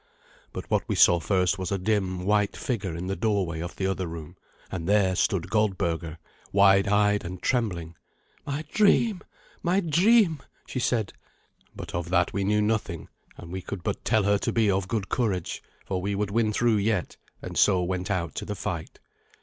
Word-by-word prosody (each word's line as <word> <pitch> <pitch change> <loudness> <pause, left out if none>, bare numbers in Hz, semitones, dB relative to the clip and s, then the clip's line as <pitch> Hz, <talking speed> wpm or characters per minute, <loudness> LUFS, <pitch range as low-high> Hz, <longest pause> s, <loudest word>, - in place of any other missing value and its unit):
But - - -7
what - - +3
we - - +1
saw 85 -1 +6
first 95 +1 +1
was 95 -1 -3
a 100 - +1
dim, 95 -2 -1
white 105 0 +1
figure 100 -9 -3
in 85 +2 -5
the 95 +1 -2
doorway 100 -8 0
of 85 +2 -5
the 95 - -2
other 95 -1 -1
room; 80 +1 -8 0.4
and 90 -1 -4
there 100 -3 +3
stood 90 -1 0
Goldberga, 85 -7 0 0.3
wide 100 0 +5
eyed 105 0 +3
and 90 +1 -6
trembling. 90 -10 -1 0.5
"My 145 +2 -4
dream, 210 -1 +3 0.4
my 180 +3 +2
dream!" 175 - +3 0.2
she 130 - -4
said. 115 -5 0 0.6
But - - -8
of 85 0 -3
that 85 -1 +2
we 100 +1 -1
knew 105 +2 +2
nothing; 105 -6 -2 0.3
and 85 - -10
we 95 +1 -4
could 90 -1 -7
but - - -3
tell 110 -2 +2
her 100 0 +2
to - - -1
be 110 -3 +2
of 95 -1 -1
good 105 -1 -2
courage, 100 -9 -1 0.2
for 95 -2 -2
we 100 +2 -2
would 100 0 -2
win 110 0 +2
through 115 0 +2
yet, 105 -3 -1 0.3
and - - -6
so 95 -3 +4
went 90 +1 -3
out 90 -4 -1
to - - -3
the 105 - -4
fight. 85 -5 -5
100 Hz, 190 wpm, -26 LUFS, 90-110 Hz, 0.6 s, saw